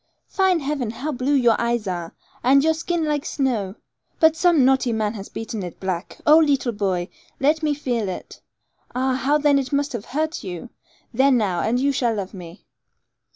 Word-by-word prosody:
Fine 380 -4 +1
heaven! 275 -4 -2
how 260 +7 -4
blue 275 +2 0
your 240 -4 +4
eyes 235 -2 0
are, 175 -3 -4 0.3
and 275 +3 +5
your 320 +1 +3
skin 335 0 -2
like 295 -2 -1
snow; 225 -8 -1 0.4
but 320 0 +5
some 330 -5 +4
naughty 265 -2 +3
man 215 -1 -1
has 200 -3 -8
beaten 225 -1 -5
it 175 -3 -7
black. 185 -1 -4
Oh, 305 +2 +7
leetle 280 -5 +2
boy, 190 -5 -1 0.3
let 300 +4 +2
me 300 -2 0
feel 240 -8 -2
it. 185 - -8 0.5
Ah, 260 +1 +1
how 270 +3 +2
then 290 -1 +3
it 260 -2 -4
must 285 0 0
have 230 -3 -5
hurt 315 +4 -3
you! 185 +5 -7 0.4
There 265 +4 +4
now, 210 -9 +1
and 240 +6 0
you 280 +2 +2
shall 240 -4 0
love 195 -1 -5
me.' 180 -1 -11
255 Hz, 190 wpm, -22 LUFS, 210-290 Hz, 0.5 s, Oh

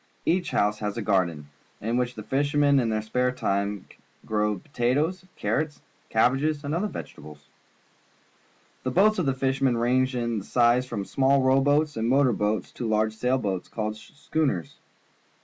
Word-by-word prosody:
Each 175 +1 +1
house 105 +1 +1
has 105 +1 -3
a 115 - -2
garden, 85 -8 0 0.3
in 115 +3 -2
which 125 0 -1
the 110 - -7
fishermen 145 +3 +2
in 120 -3 0
their 110 -1 -1
spare 125 +3 0
time 100 -4 -2 0.4
grow 105 -1 0
potatoes, 145 - -1
carrots, 155 -1 -2 0.3
cabbages, 135 +7 +2
and 145 +1 -3
other 180 +6 0
vegetables. 75 - -10 1.4
The 130 - -2
boats 205 +9 +3
of 170 - 0
the 135 - +1
fishermen 135 -2 +1
range 130 +2 +1
in 120 -3 -1
size 120 +4 +2
from 105 -5 -4
small 135 +3 +2
row 130 +1 +4
boats 145 +1 +2
and 115 +1 0
motor 135 -1 +4
boats 105 -1 -1
to 120 - -5
large 110 0 +1
sail 125 +4 0
boats 95 -7 -3
called 110 -1 -3
schooners. 140 - -3
125 Hz, 160 wpm, -26 LUFS, 110-140 Hz, 1.4 s, row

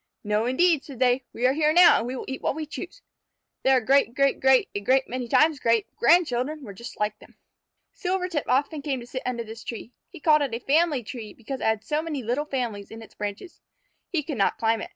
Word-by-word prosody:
"No, 210 +2 0
indeed," 315 +4 +3
said 275 -4 -10
they; 250 +1 +2
"we 240 - -2
are 260 - +4
here 305 +1 +2
now, 350 +2 +7
and 235 - -4
we 255 - -4
will - - -6
eat 265 - -5
what - - -1
we 315 0 -4
choose." 360 +10 -9 0.6
Their 265 -1 +4
great 260 0 +2
great 275 0 +2
great 265 -1 +4
a - - -2
great 260 +6 +2
many 250 0 -4
times 305 +4 +3
great 230 -2 0
grandchildren 300 -1 +2
were 205 -5 -8
just 235 +5 -10
like 210 0 -1
them. - - -19 0.6
Silvertip 360 -4 -2
often 285 +4 0
came 275 -3 -2
to - - -9
sit 255 +1 -6
under 240 -2 -2
this 225 0 -10
tree. 230 0 -7 0.2
He 355 - -12
called 305 0 +4
it 270 -5 -1
a - - -4
family 290 0 +2
tree, 220 -2 -8
because 260 +3 -7
it - - -2
had 220 -1 +1
so 300 0 -1
many 305 -5 -4
little 245 +7 -1
families 235 -8 -4
in 225 0 -10
its - - -16
branches. 205 - -7 0.5
He 330 -4 -1
could 280 -5 -5
not 195 - +2
climb 225 -1 +1
it. - - -7
260 Hz, 235 wpm, -25 LUFS, 230-300 Hz, 0.6 s, now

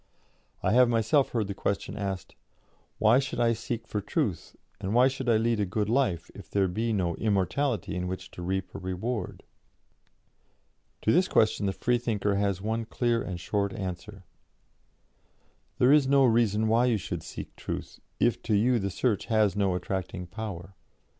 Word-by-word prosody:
"I 95 - +2
have 125 +1 +5
myself 115 +4 +2
heard 115 -3 -1
the 100 - -3
question 100 +1 -2
asked: 100 -3 -4 0.6
'Why 110 +4 +5
should 135 +1 -3
I 115 -1 +3
seek 115 0 -4
for 105 - -2
truth, 95 -3 -2 0.2
and 95 +4 -2
why 125 +2 +6
should 130 -1 -3
I 115 - +5
lead 115 0 +1
a 105 - +2
good 105 +2 -1
life, 115 -9 0
if - - -12
there 100 -1 +2
be 110 +6 -1
no 90 -5 0
immortality 110 +3 0
in 90 -1 -2
which 95 +1 -6
to - - -9
reap 95 +2 -3
a - - -6
reward?' 95 +6 -4 1.6
To 110 - +3
this 185 +6 +4
question 110 -2 +2
the - - +1
Freethinker 115 -2 0
has 100 -1 0
one 110 +1 -1
clear 120 0 0
and 90 -2 -5
short 100 +3 -1
answer: 95 +1 -6 1.5
'There 130 +1 +5
is 150 -3 +5
no 135 0 +5
reason 110 -2 +3
why 115 +3 +4
you 120 -3 +2
should 90 - -5
seek - - -8
Truth, - - -6 0.2
if 120 - +2
to 110 - 0
you 120 +4 +3
the 100 -1 -2
search 105 +1 0
has 110 -4 +2
no 100 -3 +1
attracting 90 0 -4
power. 95 -1 -7
105 Hz, 175 wpm, -28 LUFS, 95-120 Hz, 1.6 s, why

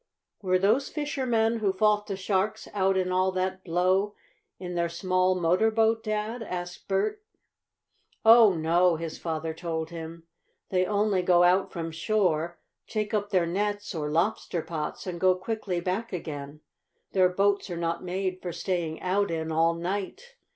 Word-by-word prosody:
"Were 185 -2 +2
those 220 +9 +2
fishermen 245 -7 0
who 205 -3 +2
fought 210 +2 +2
the 195 - -3
sharks 195 +2 -1
out 195 -1 +2
in 185 -1 0
all 185 +1 +2
that 185 0 -2
blow 185 +4 +1 0.4
in 180 -1 -6
their 170 -1 0
small 185 +2 +1
motor 180 +6 +3
boat, 225 0 +2
Dad?" 215 +2 -2
asked 175 -4 -6
Bert. 205 - 0 1.0
"Oh, 225 -4 +8
no," 170 +2 +3
his 165 0 -6
father 160 -1 -3
told 160 -1 -4
him. 165 0 -8 0.5
"They 185 -1 +1
only 205 -2 +1
go 175 -1 +4
out 185 +2 +3
from 165 -2 -4
shore, 170 -1 0 0.3
take 215 -1 -3
up 205 -1 0
their 185 -4 +2
nets 205 +4 -2
or 150 -3 -3
lobster 170 +1 0
pots, 155 -3 -5
and 175 -2 -5
go 185 -1 +5
quickly 190 -1 -3
back 185 +6 -2
again. 150 -4 -6 0.5
Their 185 -1 +4
boats 200 +2 +1
are 175 - -4
not 170 +1 -2
made 185 0 -3
for 175 - -4
staying 170 -3 -2
out 200 +2 +1
in 160 -1 -3
all 165 +1 +2
night. 195 - -4
185 Hz, 160 wpm, -27 LUFS, 170-205 Hz, 1.0 s, Oh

